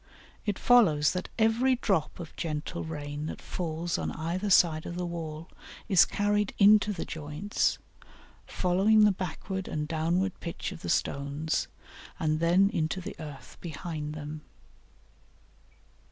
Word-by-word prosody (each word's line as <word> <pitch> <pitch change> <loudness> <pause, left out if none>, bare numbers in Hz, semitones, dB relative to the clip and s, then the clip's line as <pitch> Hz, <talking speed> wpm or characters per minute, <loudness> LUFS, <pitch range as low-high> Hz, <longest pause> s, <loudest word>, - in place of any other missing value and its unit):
It 205 - 0
follows 165 -12 +5
that 180 0 -4
every 235 +4 +3
drop 195 -11 0
of 170 -2 -8
gentle 155 +1 -3
rain 150 -1 -5
that - - -6
falls 170 -1 -3
on - - -2
either 175 +6 -2
side 160 -4 +4
of 170 - -5
the 180 0 -2
wall 165 -1 -5 0.4
is 190 -6 +6
carried 205 0 0
into 210 +1 +6
the 185 - -4
joints, 155 +6 -1 0.7
following 195 +4 +3
the 210 - +6
backward 190 +1 -4
and 150 -1 -3
downward 170 +4 0
pitch 170 - -5
of - - -9
the - - -5
stones, 140 +3 -1 0.5
and 155 -1 +1
then 180 +4 +4
into 170 -2 -1
the 180 - -7
earth 150 -4 -10
behind 155 -2 -5
them. 150 0 -6
170 Hz, 140 wpm, -29 LUFS, 155-195 Hz, 0.7 s, is